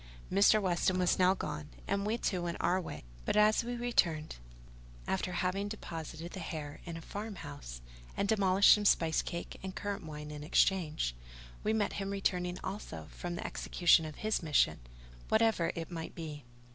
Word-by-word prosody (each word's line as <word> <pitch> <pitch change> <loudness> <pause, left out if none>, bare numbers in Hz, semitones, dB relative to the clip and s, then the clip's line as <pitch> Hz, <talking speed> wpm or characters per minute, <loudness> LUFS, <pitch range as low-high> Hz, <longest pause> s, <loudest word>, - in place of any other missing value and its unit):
Mr. 200 +3 +6
Weston 185 -1 +1
was 180 0 +2
now 185 +1 +5
gone, 150 -3 -5 0.2
and 200 +1 0
we 225 +2 +1
too 185 -6 -1
went 170 -1 -3
on - - +1
our 185 +2 +2
way; 170 - -7 0.2
but - - 0
as 215 +2 +5
we 245 +1 -3
returned, 175 -10 +1 0.7
after 190 -1 -1
having 185 +3 0
deposited 165 -5 -6
the 190 - -6
hare 150 -4 -6
in 170 -2 -5
a - - -8
farm 205 +5 -6
house, - - -8 0.4
and 200 - +1
demolished 200 -2 +6
some 210 - +1
spice 165 -5 +3
cake 170 - -6
and 190 -1 -6
currant 205 -2 -3
wine 150 -1 -7
in 150 0 -7
exchange, 155 - +2 0.5
we 215 - +2
met 220 -2 +1
him 195 -1 -3
returning 180 -2 -1
also 80 - -6
from 175 -1 -5
the - - -5
execution 175 -2 +3
of 155 -2 -6
his 215 0 0
mission, 155 -4 +3 0.5
whatever 220 -6 +3
it 165 +1 -5
might 165 -1 -6
be. 150 -5 -7
180 Hz, 180 wpm, -33 LUFS, 160-200 Hz, 0.7 s, Mr